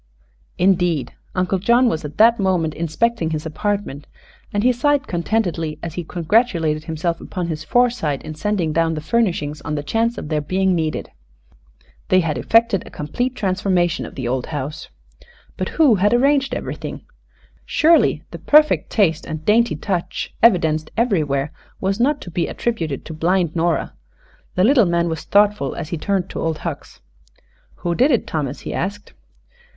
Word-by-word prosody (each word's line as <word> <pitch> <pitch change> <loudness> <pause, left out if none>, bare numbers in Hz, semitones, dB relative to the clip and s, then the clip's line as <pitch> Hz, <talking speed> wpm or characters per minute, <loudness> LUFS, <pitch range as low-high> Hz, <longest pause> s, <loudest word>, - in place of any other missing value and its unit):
Indeed, 175 -7 +1 0.2
Uncle 185 +1 0
John 235 +6 +4
was 160 -8 -1
at 150 +1 -8
that 230 +1 +5
moment 180 -5 +1
inspecting 170 +3 -1
his 155 -1 -3
apartment, 185 -3 -3 0.4
and 205 0 0
he 250 - +5
sighed 285 +2 +1
contentedly 170 -4 -1
as 165 -2 -5
he 175 - -4
congratulated 165 -3 +1
himself 165 +1 -2
upon 180 -2 -4
his 155 -1 -4
foresight 235 - +1
in 155 - -6
sending 175 -1 -1
down 165 0 +1
the - - -3
furnishings 155 -7 -1
on 150 - -3
the 145 - -3
chance 225 +10 0
of 150 - -6
their 155 -2 0
being 185 +5 +1
needed. 160 -3 -2 1.0
They 185 0 +5
had 160 -3 -1
effected 225 - +3
a - - -12
complete 245 - -3
transformation 185 -4 0
of - - -13
the 130 -3 -4
old 125 0 -2
house. 150 0 -5 0.7
But - - -3
who 305 -7 +6
had 205 +3 +3
arranged 275 +2 +2
everything? - - -5 0.6
Surely 330 +2 +3
the - - -8
perfect 300 0 +4
taste 165 -8 +1
and 155 0 -6
dainty 235 +3 +3
touch 180 -4 -3
evidenced 160 -8 +3
everywhere 155 - +1 0.3
was 195 +2 -1
not 285 +4 +2
to 175 - -9
be 170 +1 -1
attributed 165 - -3
to 160 - -7
blind 170 +1 0
Nora. 170 0 0 0.6
The 180 - +3
little 240 -2 +5
man 170 0 +1
was 160 -1 -4
thoughtful 205 -9 +2
as 160 -3 -5
he 170 - -3
turned 195 0 -1
to - - -4
Old 160 -1 -1
Hucks. - - -6 0.8
"Who 175 - +1
did 255 - +3
it, 245 -7 +2
Thomas?" 145 -4 -3
he - - -5
asked. 205 +3 -4
175 Hz, 165 wpm, -20 LUFS, 155-220 Hz, 1.0 s, who